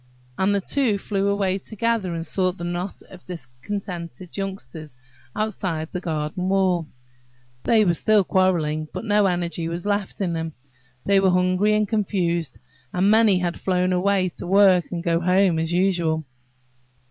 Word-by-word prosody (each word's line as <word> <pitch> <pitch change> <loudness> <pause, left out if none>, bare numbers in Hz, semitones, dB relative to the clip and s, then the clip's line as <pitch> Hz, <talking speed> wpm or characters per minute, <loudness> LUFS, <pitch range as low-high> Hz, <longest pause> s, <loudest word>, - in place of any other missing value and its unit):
And 195 +5 +1
the 200 - +1
two 240 -1 +1
flew 200 0 -1
away 200 -1 0
together 220 -3 -2
and 165 0 -4
sought 185 +2 0
the 175 - -7
knot 175 +2 -4
of 185 -2 -13
discontented 170 +3 -7
youngsters 160 -8 -6 0.4
outside 185 -7 -2
the 180 - -4
garden 165 +3 -2
wall. 185 -4 +2 0.8
They 220 -2 +4
were 175 - +3
still 210 +4 +3
quarrelling, 165 -5 +1
but - - -5
no 205 -2 +3
energy 170 -2 -2
was 170 +2 -4
left 205 -1 -1
them. 165 -4 -3 0.5
They 200 -1 +4
were 195 -1 +3
hungry 185 +3 +2
and 210 0 +1
confused, 180 - -1 0.3
and 190 +3 +2
many 220 -3 +5
had 175 -1 -2
flown 185 -1 +1
away 185 +1 +2
to - - -6
work 190 -2 +5
and 170 -2 -4
go 170 -1 +1
home 180 -1 +3
as 165 +1 -1
usual. 175 -4 +1
185 Hz, 155 wpm, -23 LUFS, 170-200 Hz, 0.8 s, many